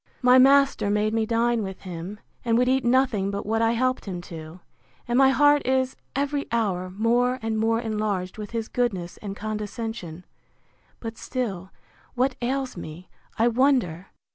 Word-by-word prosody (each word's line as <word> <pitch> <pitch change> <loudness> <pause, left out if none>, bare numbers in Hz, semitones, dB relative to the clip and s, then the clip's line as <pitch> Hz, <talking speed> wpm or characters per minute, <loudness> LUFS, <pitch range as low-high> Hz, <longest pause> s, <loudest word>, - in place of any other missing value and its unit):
My 250 +1 +7
master 275 -4 +5
made 210 +1 +1
me 225 -1 +1
dine 235 0 +1
with 190 -2 -6
him, 185 +3 -7 0.2
and 230 -1 +2
would 250 +1 +3
eat 260 0 +2
nothing 240 -5 +2
but 200 0 -4
what 225 +2 0
I 230 0 +3
helped 255 +2 0
him 185 -3 -4
to; 160 +2 -9 0.5
and 240 - 0
my 265 +1 +6
heart 290 +2 +5
is, 260 0 +1 0.2
every 285 +1 -1
hour, 195 -6 0
more 240 +6 +1
and 220 -1 -1
more 225 +1 +2
enlarged 210 -4 -2
with 210 -1 -6
his 225 -1 -3
goodness 195 -9 -2
and 200 -2 -6
condescension. 210 -4 -5 0.7
But 225 -1 -7
still, 195 -8 -4 0.5
what 255 +1 +1
ails 260 +2 -2
me, 170 +1 -9 0.3
I 230 - +4
wonder! 235 - +2
225 Hz, 165 wpm, -25 LUFS, 200-255 Hz, 0.7 s, My